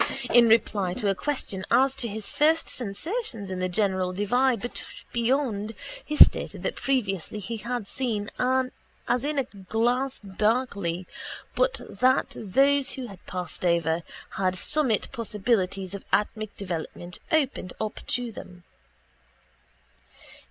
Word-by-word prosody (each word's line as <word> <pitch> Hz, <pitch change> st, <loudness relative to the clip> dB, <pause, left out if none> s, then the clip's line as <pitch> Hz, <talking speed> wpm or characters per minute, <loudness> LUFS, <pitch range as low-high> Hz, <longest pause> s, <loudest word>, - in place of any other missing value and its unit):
In 240 Hz, -1 st, +8 dB
reply 205 Hz, -5 st, +3 dB
to 210 Hz, -3 st, 0 dB
a -, -, +2 dB
question 200 Hz, -5 st, -2 dB
as 270 Hz, +1 st, +4 dB
to 240 Hz, -, -1 dB
his 215 Hz, -1 st, -5 dB
first 315 Hz, +2 st, +3 dB
sensations 240 Hz, -, -3 dB
in 185 Hz, -, -3 dB
the 185 Hz, 0 st, 0 dB
great 185 Hz, -2 st, 0 dB
divide 245 Hz, +3 st, +2 dB, 0.4 s
beyond 235 Hz, -3 st, 0 dB, 0.3 s
he 300 Hz, -, -4 dB
stated -, -, +6 dB
that -, -, -1 dB
previously 210 Hz, -8 st, -1 dB
he 210 Hz, +3 st, -4 dB
had 235 Hz, -1 st, -3 dB
seen 215 Hz, -5 st, -2 dB, 0.8 s
as 245 Hz, +1 st, +1 dB
in 295 Hz, +1 st, -1 dB
a 275 Hz, -, +3 dB
glass 240 Hz, +5 st, -1 dB
darkly 200 Hz, -3 st, 0 dB, 0.5 s
but -, -, +1 dB
that 255 Hz, +6 st, +2 dB
those 275 Hz, +7 st, +2 dB
who 260 Hz, -, -5 dB
had 195 Hz, -3 st, -12 dB
passed 180 Hz, -2 st, -5 dB
over 170 Hz, -1 st, +2 dB, 0.3 s
had 185 Hz, -1 st, 0 dB
summit 240 Hz, -, +2 dB
possibilities 205 Hz, -5 st, 0 dB
of 200 Hz, -, -6 dB
atmic 215 Hz, 0 st, 0 dB
development 175 Hz, -1 st, -5 dB
opened 275 Hz, -, +1 dB
up 215 Hz, -1 st, -3 dB
to 245 Hz, -1 st, -1 dB
them. 180 Hz, -4 st, -11 dB
215 Hz, 130 wpm, -26 LUFS, 190-255 Hz, 0.8 s, In